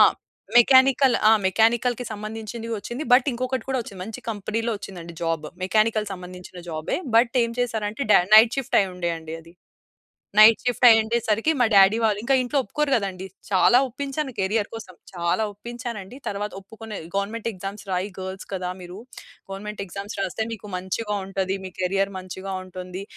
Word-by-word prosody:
ఆ! - - +10 0.5
మెకానికల్. 260 +1 +6
ఆ! - - +7
మెకానికల్‌కి 235 +4 +2
సంబంధించింది 220 +2 -6
ఒచ్చింది. 240 +8 -5
బట్ 250 +2 +6
ఇంకొకటి 255 0 -3
కూడా 265 -1 0
ఒచ్చింది. 195 -4 -11
మంచి 220 +2 -8
కంపెనీలో 225 +2 -2
ఒచ్చిందండి 170 -4 -9
జాబ్. 165 -2 -1 0.2
మెకానికల్‌కు 215 +1 +1
సంబంధించిన 180 0 -10
జాబే, 155 -1 -2 0.2
బట్ 235 +2 +4
ఏం 230 - -4
చేసారంటే 220 0 -2
డా - - +7
నైట్ 225 +3 +7
షిఫ్ట్ 270 - +1
అయ్యుండే 180 -3 -2
అండి 160 0 -8
అది. 165 +1 -18 0.8
నైట్ 215 +1 +8
షిఫ్ట్ 245 0 +1
అయ్యుండే 225 +1 +4
సరికి 225 +8 +1
మా 245 - +4
డ్యాడీ 195 +2 +6
వాళ్ళు 215 -2 +2
ఇంకా 270 +4 +2
ఇంట్లో 255 +3 0
ఒప్పుకోరు 295 +7 -2
కదండీ. 195 -5 -2 0.2
చాలా 200 +5 +5
ఒప్పించాను 275 +2 -4
కెరీర్ 205 +2 0
కోసం. 215 -5 -9 0.2
చాలా 170 +3 0
ఒప్పించానండి. 235 0 -7
తరువాత 205 +1 -3
ఒప్పుకునే 220 +2 -10 0.2
"గవర్నమెంట్ 205 +3 -2
ఎగ్జామ్స్ 195 +1 -7
రాయి 185 +2 -1
గర్ల్స్ 190 0 -6
కదా! 180 -1 -3
మీరు 180 0 -9 0.5
గవర్నమెంట్ 205 +2 -6
ఎగ్జామ్స్ 200 +3 -7
రాస్తే 195 +3 -2
మీకు 215 -2 -8
మంచిగా 190 +4 -3
ఉంటది. 190 -1 -2
మీ 185 - -6
కెరీయర్ 195 +2 0
మంచిగా 190 +1 -7
ఉంటుంది" 185 0 -7
210 Hz, 160 wpm, -24 LUFS, 190-230 Hz, 0.8 s, ఆ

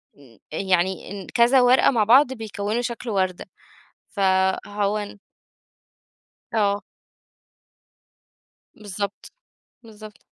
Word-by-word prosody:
م 130 -6 -20
يعني 190 +3 -1
ن - - -15
كذا 245 +2 +4
ورقة 250 +2 +5
مع 230 -5 +2
بعض 255 +5 +5
بيكوِّنوا 215 0 -4
شكل 240 0 -5
وردة، 185 -3 -1 0.7
فهو 195 +1 0
ان 205 0 -7 1.3
آه. 205 -2 +1 1.9
بالضبط، 200 0 -6 0.5
بالضبط. 215 -1 -13
205 Hz, 85 wpm, -23 LUFS, 190-230 Hz, 1.9 s, ورقة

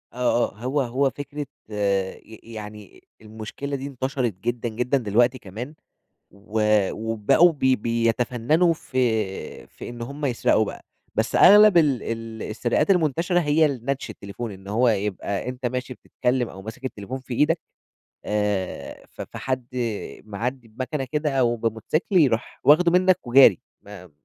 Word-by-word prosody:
آه، 125 -1 +1
آه، - - -23
هو 135 +3 0
هو 135 +2 +1
فكرة 145 +1 -6 0.2
ي 105 +2 -3
يعني 105 -2 -10 0.2
المشكلة 110 +6 -6
دي 135 0 -5
انتشرِت 130 -3 -2
جدًا، 120 0 -2
جدًا، 125 +5 0
دلوقتي 120 +2 +2
كمان 120 +5 -8 0.6
و 105 +2 -5 0.3
وبقوا 115 +10 +3
بي 130 -3 +2
بيتفنّنوا 120 +8 +1
في 110 -9 -2
في - - -10
إن 120 0 -7
هُم 140 +5 -6
يسرقوا 120 -4 +2
بقى، - - -8 0.3
بس - - -1
أغلَب 210 -1 +8
ال 145 -8 +3
ال 115 -1 -5
السرقات 120 - 0
المنتشرة 175 0 +2
هي 155 0 +3
ال 135 -5 -4
نَتش 135 -3 -2
التليفون، 105 +2 -7
إن 95 0 -12
هو 120 +5 +2
يبقى 100 0 -2
أنت 125 0 -4
ماشي 125 +1 -3
بتتكلّم 125 0 -1
أو 95 - -11
ماسك 110 +6 -9
التليفون 125 0 -5
في 130 -1 -7
إيدك 155 +7 +2 0.7
آآ، 105 -3 -2
ف - - -10
فحد 130 -2 -4 0.6
معدّي 120 +4 -4
بمكنة 130 +6 -4
كده 150 0 0
أو 120 -2 +2
بموتوسيكل 115 - -1
يرُوح 125 -8 +1
واخدُه 170 +4 +5
منك 185 +1 +4
وجاري، 120 -6 +7 0.2
ما 95 -4 -12
120 Hz, 145 wpm, -24 LUFS, 110-140 Hz, 0.7 s, أغلَب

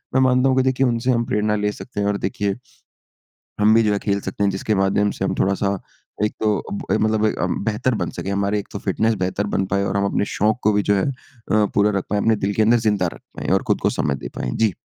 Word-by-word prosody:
मैं 130 - +5
मानता 130 0 +3
हूँ 130 - +2
कि 130 - +4
देखिए 130 0 +2
उनसे 120 +2 +1
हम 120 -1 +1
प्रेरणा 105 0 0
ले 105 0 0
सकते 105 +1 -8
हैं 100 - +1
और 105 0 +1
देखिए, 100 -1 -2 1.1
हम 105 +1 +5
भी 115 - +5
जो 105 -2 +2
है 100 - +1
खेल 100 0 -1
सकते 95 +1 -3
हैं। 100 - +3
जिसके 95 +3 -1
माध्यम 95 +1 +2
से - - -4
हम - - 0
थोड़ा-सा 100 0 +1 0.5
एक 105 - 0
तो 105 -2 +1
ब 100 - -1
मतलब 110 0 +1
ए 110 - +1
हम 90 +2 -1
बेहतर 115 +4 0
बन 85 - -2
सकें 95 - -5
हमारी 100 +1 0
एक 100 - -6
तो - - -4
फ़िटनेस 110 +4 0
बेहतर 95 +3 -1
बन 95 - +1
पाए 100 +1 0
और 100 0 -1
हम 100 - +1
अपने 100 - 0
शौक़ 105 +2 +2
को 105 - +3
भी 105 0 +2
जो - - +5
है 95 - +1
अ, 140 - 0 0.6
पूरा 100 +1 +4
रख 95 - -4
पाएँ, 105 0 +1
अपने 110 -1 +3
दिल 100 0 -1
के 110 - +2
अंदर 115 +2 +4
ज़िंदा 105 -5 +1
रख - - -14 0.2
पाएँ - - -5
और - - +2
खुद - - +2
को - - +2
समय 70 - +1
दे - - -3
पाएँ। 65 - -2
जी। 110 -3 +2
105 Hz, 270 wpm, -21 LUFS, 100-110 Hz, 1.1 s, मैं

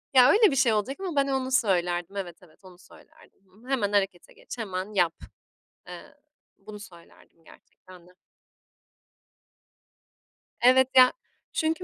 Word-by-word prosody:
Ya, 250 -1 +7
öyle 430 -3 +4
bir 275 - -2
şey 245 -3 +2
olacak 215 +6 -2
ama 370 -5 -5
ben 280 -1 +1
onu 265 -1 -2
söylerdim. 180 -5 -1
Evet, 180 -4 -6
evet, 160 -3 -22
onu 185 -2 -16
söylerdim. 195 - -21 0.2
Hı, 250 - -17
"Hemen 215 -7 -1
harekete 195 -3 -2
geç, - - -11
hemen 195 -1 -6
yap." 175 -4 +1 0.8
Eee, - - -12 0.4
bunu 210 +1 -12
söylerdim 170 -3 -18
gerçekten 180 +1 -19
de. - - -20 2.5
Evet, 260 +1 +5
ya 255 -1 +7 0.4
çünkü 320 +3 -2
210 Hz, 135 wpm, -25 LUFS, 180-260 Hz, 2.5 s, Ya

